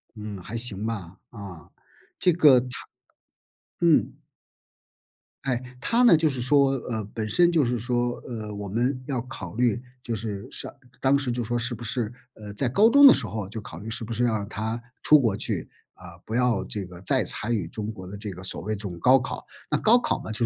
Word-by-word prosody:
嗯， 105 -2 -7
还 110 +6 -8
行 110 -3 +1
吧， 100 -6 -5
啊。 95 -8 -10 0.5
这 180 - +4
个 150 -6 +6
她 125 - -7 1.1
嗯。 170 -3 +3 1.3
哎， 125 -3 0 0.2
她 235 - +2
呢 235 - +8
就 155 0 +2
是 135 -3 -4
说 135 +2 +3
呃， 115 -4 -3
本 110 -1 -2
身 175 +8 +4
就 160 -4 +3
是 120 0 -1
说， 120 +1 0
呃， 110 -3 -6
我 100 -1 -6
们 125 +5 0
要 135 -4 -1
考 125 -3 -8
虑 120 0 +1 0.2
就 115 - -3
是 105 -2 -5
上 - - -4 0.3
当 135 +1 +3
时 135 -3 -1
就 120 0 -2
说 120 +2 -1
是 120 +1 +1
不 120 - -8
是 115 0 -2 0.2
呃， 105 -1 -9
在 125 +4 +1
高 210 - +5
中 285 +1 +9
的 270 - +10
时 - - 0
候 105 -1 -5
就 110 +1 -6
考 - - -9
虑 110 - -7
是 115 +1 0
不 115 +1 -5
是 125 - 0
要 120 - +2
让 100 -1 -3
她 110 +2 -3 0.2
出 150 -1 +7
国 115 -6 +1
去， - - -3 0.3
呃， 95 - -14 0.2
不 110 - -3
要 120 -5 +2
这 100 -3 -4
个 90 -1 -12
再 95 - +3
参 115 +3 +1
与 95 -6 -2
中 105 +5 -5
国 95 -4 -10
的 95 - -8
这 105 +1 -5
个 90 -1 -8
所 95 - -1
谓 110 +2 -2
这 105 - -8
种 90 -5 -6
高 130 +9 +6
考。 125 0 -5 0.3
那 150 - +2
高 230 +3 +5
考 245 - -1
嘛， - - -6
就 110 +2 0
115 Hz, 235 characters per minute, -25 LUFS, 105-130 Hz, 1.3 s, 的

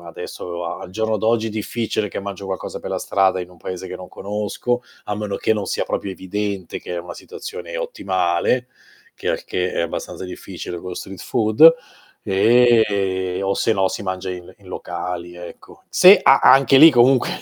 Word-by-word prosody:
adesso, 85 +1 -7
a - - -5
al - - -9
giorno 110 +2 -1
d'oggi 110 +2 +1
è - - -3
difficile 110 0 -2
che - - -5
mangio 100 -1 -7
qualcosa 95 - -5
per - - -7
la - - -1
strada 95 -1 +1
in 90 - -7
un 90 - -17
paese 90 +2 -7
che 90 - -7
non 90 - -11
conosco, 105 +4 -3 0.2
a 105 - -3
meno 105 -2 -3
che 110 - +1
non 105 -2 -3
sia - - -1
proprio 100 - -3
evidente 95 0 -4
che 90 - -6
è - - -2
una 85 +1 -8
situazione 455 +2 -8
ottimale, 125 - -1 0.5
che - - -5
al - - -3
che 90 0 -2
è - - -1
abbastanza 85 +2 -5
difficile 90 -1 -7
con 90 - -9
lo 90 - -5
street 95 +2 -8
food, 115 - +5 0.5
e 100 -4 +3
o 100 0 0
se 110 +3 +1
no 95 -1 +2
si - - -5
mangia 95 -1 -4
il 90 0 -9
in 100 - -20
locali, 90 -1 -6
ecco. 90 0 -12
Se 190 +3 +8
a 135 - +6
anche 135 0 +6
lì 160 +3 +10
comunque, 125 -1 +4
100 Hz, 195 wpm, -20 LUFS, 90-115 Hz, 0.5 s, lì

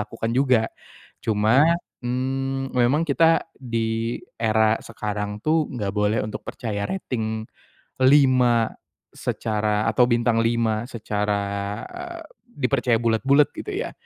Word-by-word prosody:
lakukan 115 +1 -4
juga. 130 -3 +3 0.6
Cuma, 110 +7 +3 0.4
mmm, 135 +1 -2
memang 130 +6 +2
kita 165 +2 +3
di 115 -2 -2 0.2
era 110 0 +3
sekarang, 105 -2 -5
tuh, 155 0 +2
enggak 105 -5 -3
boleh 105 +1 +1
untuk 110 - -5
percaya 105 -3 -4
rating 110 -11 -3 0.6
5 130 -4 +4 0.4
secara, 105 0 -1
atau 120 +3 +3
bintang 120 -1 +2
5 115 -1 +1
secara, 105 -3 -2 0.5
eee, 355 -2 -8 0.2
dipercaya 125 - 0
bulat-bulat, 135 +5 +3
gitu, - - -6
ya. - - -3
115 Hz, 110 wpm, -23 LUFS, 110-135 Hz, 0.6 s, 5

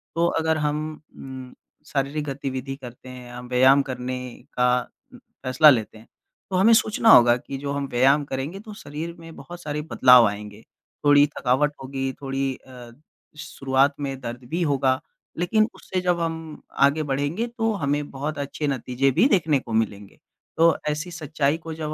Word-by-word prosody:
तो 170 +1 +2
अगर 160 0 +1
हम 150 0 -1 0.4
उम, 130 -1 -9 0.3
शारीरिक 140 +2 -2
गतिविधि 135 -1 -4
करते 130 -1 -12
हैं 125 -1 -10
या 120 0 -8
व्यायाम 130 +3 +4
करने 130 0 -4 0.4
का 125 0 +3 0.6
फैसला 130 +4 +6
लेते 115 -5 +1
हैं, 110 - -17 0.4
तो 190 - -2
हमें 200 +5 +5
सोचना 225 -1 +3
होगा 120 - +8
कि 135 +2 -7
जो 140 +1 -4
हम 140 -1 -2
व्यायाम 135 +4 +4
करेंगे 140 +7 -5
तो 215 +1 -10
शरीर 150 +4 -6
में 165 -1 -12
बहुत 175 0 -10
सारे 150 0 -3
बदलाव 125 -2 +7
आएँगे, 105 +1 -7 0.4
थोड़ी 145 0 +6
थकावट 135 +4 +1
होगी, 135 0 -3
थोड़ी 135 0 -2
अ, 125 -2 -12 0.5
शुरुआत 135 -1 0
में 135 -2 -4
दर्द 120 0 -7
भी 170 +4 -2
होगा, 135 -4 +1 0.4
लेकिन 215 +5 +2
उससे 185 -1 -4
जब 180 -1 +1
हम 160 -2 -4 0.2
आगे 150 +3 +1
बढ़ेंगे 145 - -1
तो 225 -1 +1
हमें 145 +1 -1
बहुत 145 +3 -4
अच्छे 140 +1 -3
नतीजे 135 0 0
भी 230 - +4
देखने 160 - +2
को 120 -3 -8
मिलेंगे। 105 -3 -2 0.4
तो 165 0 +5
ऐसी 155 +4 -3
सच्चाई 155 -2 -1
को 160 - -4
जब 155 -1 -4
140 Hz, 165 wpm, -24 LUFS, 130-155 Hz, 0.6 s, होगा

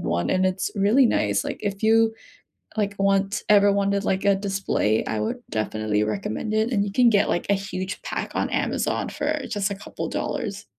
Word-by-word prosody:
one 85 0 -1
and 185 0 +2
it's 185 0 -1
really 215 +7 +4
nice. 100 - +1
Like - - -5
if 200 0 -3
you 225 0 +4 0.6
like, 205 -1 0
want 195 +1 +1
ever 205 -1 +6
wanted, 200 0 +1
like, 190 +1 0
a 200 - +5
display, 195 - 0
I 110 - -2
would 105 - -2
definitely 110 -1 -1
recommend 110 - -3
it. 220 +3 +1
And 200 -3 +2
you 200 - -4
can 245 +3 +4
get, 205 -2 +3
like, 175 - 0
a - - +5
huge 195 -1 -4
pack - - -4
on - - 0
Amazon - - -1
for 300 0 -2
just 205 -2 -1
a - - -2
couple 195 - -6
dollars. - - -3
200 Hz, 195 wpm, -24 LUFS, 185-205 Hz, 0.6 s, ever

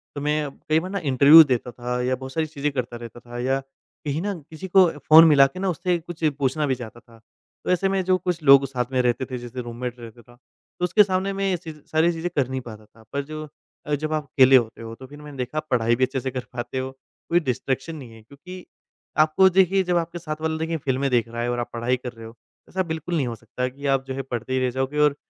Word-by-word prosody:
तो 145 - -4
मैं 150 0 0 0.2
कई 155 +1 +4
बार 180 +3 -6
ना 200 - -2
इंटरव्यू 145 +2 +8
देता 125 -4 -2
था 125 +1 -3
या 130 +1 +1
बहुत 130 +1 -9
सारी 160 -1 0
चीज़ें 150 -1 -3
करता 125 -3 -4
रहता 120 0 -10
था 120 0 -9
या 135 +2 0 0.5
कहीं 150 +2 -1
ना 205 +2 -2 0.2
किसी 160 +4 -8
को 185 -1 +6
फ़ोन 155 +4 +8
मिला 140 -3 +7
के 160 +7 -10
ना 195 0 0
उससे 180 +1 0
कुछ 170 0 -10
पूछना 140 +2 0
भी 130 - +1
चाहता 120 -1 -9
था, 115 -1 -20 0.4
तो - - -1
ऐसे 180 +2 +2
में 195 -1 0
जो 185 0 +3
कुछ 180 -2 -3
लोग 140 -1 +7
साथ 125 -2 -2
में 130 -1 +2
रहते 125 +1 0
थे, 130 -1 -5
जैसे 120 +1 -7
रूममेट 120 +1 -6
रहता 115 0 -11
था 120 +1 -20 0.4
तो - - -3
उसके 210 +4 +5
सामने 190 0 -1
मैं 195 0 -1
ये 180 - 0
च 160 - -5 0.2
सारी 160 +2 +3
चीज़ें 165 +2 -3
कर 140 -4 +2
नहीं 130 0 -3
पाता 110 -3 -11
था। 110 +1 -21
पर 140 - 0
जो 155 +1 -7 0.4
अ, 150 - -2
जब 155 +2 -3
आप 155 -1 -1
अकेले 130 -1 +5
होते 115 -3 +2
हो, 115 0 -7
तो 130 - -12
फिर 145 +2 -13
मैंने 145 -2 -10
देखा 125 +4 -4
आप 155 - -2
पढ़ाई 120 -1 +2
भी 130 - 0
अच्छे 130 +1 -4
से 130 +1 -4
कर 125 -1 -4
पाते 120 +2 -5
हो, 130 0 -3 0.4
कोई 170 - +4
डिस्ट्रैक्शन 135 +1 -3
नहीं 130 -7 -10
है 110 - -14
क्योंकि, 180 +9 -12 0.5
आपको 155 +5 +5
देखिए 190 +1 +3
जब 180 -1 +1
आपके 170 +1 -3
साथ 155 -2 -6
वाला 160 0 -1
देखिए 160 +1 -2
फिल्में 135 -1 -1
देख 120 -2 +2
रहा 115 +1 -5
है 120 - -1
और 120 - -2
आप 120 - -3
पढ़ाई 120 +2 0
कर 125 -1 -7
रहे 115 -1 -11
हो, 115 +1 -11 0.3
ऐसा 185 0 -1
बिल्कुल 160 +1 -4
नहीं 140 -6 0
हो 115 - -4
सकता 120 +3 -4
कि 140 +3 -11
आप 135 0 -1
जो 135 - -4
है 135 - -3
पढ़ते 125 -1 -5
ही 130 - +2
रह - - +1
जाओगे 135 +4 -2
और 150 -1 +4
140 Hz, 265 wpm, -23 LUFS, 125-160 Hz, 0.5 s, इंटरव्यू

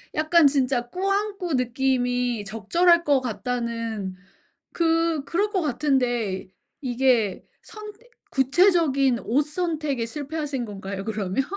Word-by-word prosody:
약간 315 0 +5
진짜 260 -3 0
꾸안꾸 390 -2 -1
느낌이 245 -2 0
적절할 335 - +3
것 280 -4 +3
같다는 230 -4 -3 0.6
그 330 -2 +1
그럴 395 +8 0
것 385 -3 0
같은데 245 - 0 0.3
이게 245 -6 +1 0.2
선 425 -1 -10 0.4
구체적인 275 -3 +3
옷 270 +7 +2
선택에 305 -6 -2
실패하신 290 -1 -4
건가요, 195 -1 -6
그러면? 210 +2 -1
270 Hz, 235 characters per minute, -24 LUFS, 235-325 Hz, 0.6 s, 약간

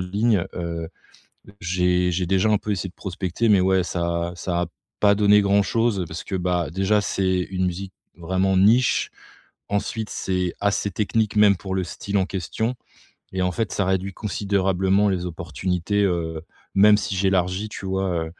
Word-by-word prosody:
ligne, 100 +2 +1
heu, 85 -2 -4 0.7
j'ai 90 +1 +1
j'ai 90 +1 -1
déjà 95 +4 +2
un 105 - +3
peu 105 +1 -3
essayé 95 -1 -3
de - - -29
prospecter, 95 +3 -2
mais 100 -3 +5
ouais, 95 -1 +2
ça 85 -1 -2
ça 85 0 -2
a - - -1 0.3
pas 100 -1 +5
donné 105 0 +5
grand-chose 100 +1 +1
parce 80 - -7
que, 100 - -5
bah, 90 -3 0
déjà, 95 +5 +2
c'est 95 -2 0
une 95 -1 -1
musique 95 +2 -5 0.2
vraiment 95 +2 0
niche. 115 +6 +3 0.6
Ensuite, 105 +2 -2
c'est 90 -2 -1
assez 100 0 0
technique 105 +3 -1
même 105 -2 +6
pour 95 0 -5
le 95 - 0
style 100 +3 -3
en 95 - +1
question 100 +7 -3 0.6
et 95 0 -1
en 90 0 0
fait 110 +2 -2
ça 100 - 0
réduit 95 0 -1
considérablement 100 -1 +1
les 90 -2 -2
opportunités, 90 +4 -2
heu, 80 -4 -1 0.3
même 105 +2 +7
si 100 -1 -3
j'élargis 95 +1 +1
tu 100 - -8
vois, 95 -3 -1
95 Hz, 165 wpm, -23 LUFS, 90-100 Hz, 0.7 s, même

